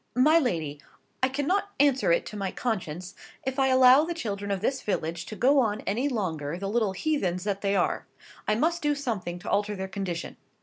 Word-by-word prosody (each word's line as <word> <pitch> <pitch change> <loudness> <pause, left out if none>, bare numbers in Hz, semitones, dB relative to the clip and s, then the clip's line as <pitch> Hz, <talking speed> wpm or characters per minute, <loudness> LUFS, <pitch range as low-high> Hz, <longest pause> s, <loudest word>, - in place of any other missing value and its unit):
"My 305 +6 +5
lady, 160 - -2 0.4
I 260 - +3
cannot 300 +10 0
answer 275 -9 +4
it 170 - +2
to - - -8
my 195 -2 -2
conscience, 185 -7 -3 0.3
if 265 +1 -2
I 265 - +4
allow 260 +2 +7
the 340 +1 -3
children 200 -9 -4
of 200 -1 0
this 265 +7 -1
village 170 -4 -2
to 215 - -6
go 270 +7 +4
on 215 -4 +1
any 245 +8 -1
longer 165 - -2
the 195 +1 -4
little 215 -3 +1
heathens 190 - -1
that 200 -1 -2
they 200 0 +1
are. 180 - 0 0.4
I 215 - +3
must 330 +8 +1
do 295 -1 +1
something 220 -11 -3
to 180 - -7
alter 210 +1 +1
their 190 0 -4
condition. 190 -3 -4
210 Hz, 205 wpm, -27 LUFS, 185-265 Hz, 0.4 s, allow